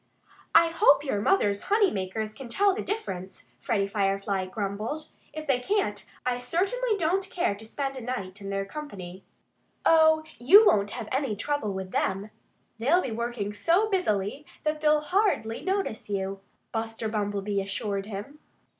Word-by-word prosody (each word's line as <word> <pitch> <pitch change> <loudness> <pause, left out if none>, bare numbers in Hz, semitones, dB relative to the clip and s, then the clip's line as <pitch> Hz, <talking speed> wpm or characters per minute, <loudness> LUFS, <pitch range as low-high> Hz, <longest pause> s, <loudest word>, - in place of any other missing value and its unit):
"I 335 0 +7
hope 310 -4 +5
your 240 -8 -1
mother's 205 - +2
honey 410 -2 +4
makers 210 +3 -3
can 260 +1 -9
tell 395 +10 +3
the 395 - -3
difference," 190 - -5
Freddie 200 -3 0
Firefly 195 -1 0
grumbled. 215 +10 -4 0.2
"If 310 +1 -6
they 270 -4 +2
can't, 250 - 0 0.2
I 250 -1 0
certainly 400 - 0
don't 375 +3 0
care 350 - 0
to 215 +2 -10
spend 275 +3 -3
a - - -6
night 205 -6 -5
in 195 - -6
their 195 0 -1
company." 195 -8 -8 0.6
"Oh, 315 -1 +6 0.2
you 390 - +8
won't 205 - +4
have 220 - -5
any 265 -4 0
trouble 260 -1 -1
with 190 -1 -5
them. 195 +4 -1 0.5
They'll 315 +11 +3
be 255 - -3
working 230 -2 -3
so 355 - +2
busily 215 - 0 0.2
that 305 0 -1
they'll 300 0 +4
hardly 355 - +1
notice 380 - -2
you," 195 -1 -2 0.3
Buster 225 0 -3
Bumblebee 205 -1 -1
assured 200 0 -3
him. 220 +9 -7
230 Hz, 155 wpm, -27 LUFS, 200-315 Hz, 0.6 s, you